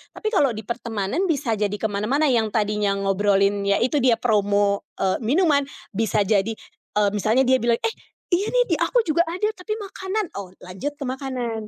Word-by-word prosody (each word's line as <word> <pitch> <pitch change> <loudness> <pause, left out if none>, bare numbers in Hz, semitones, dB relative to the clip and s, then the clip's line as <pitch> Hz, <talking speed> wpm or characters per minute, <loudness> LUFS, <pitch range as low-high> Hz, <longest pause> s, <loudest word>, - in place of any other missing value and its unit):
tapi 435 - -4
kalau 285 -8 +4
di 220 - -6
pertemanan 230 - -2
bisa 280 -7 0
jadi 205 -1 -1
kemana-mana 215 +8 0
yang 225 -3 +2
tadinya 210 -2 0
ngobrolin 200 0 +1
ya 200 - +3
itu 260 +5 +1
dia 245 -2 +4
promo, 205 -3 +1
eee, 190 -1 +1
minuman, 290 +3 +3 0.3
bisa 215 0 +1
jadi, 205 +2 +1 0.5
e 210 - +4
misalnya 215 +5 +2
dia 260 +1 +4
bilang, 235 0 +2
"Eh, 455 - 0 0.4
iya 390 +4 +2
nih - - +3
di - - +4
aku 485 -2 +2
juga 335 0 +2
ada 365 +5 -2
tapi 400 +4 -5
makanan," 400 0 -3
oh 190 -2 -7
lanjut 185 +11 -5
ke 290 - -7
makanan. 250 -4 -4
225 Hz, 180 wpm, -23 LUFS, 205-290 Hz, 0.5 s, kalau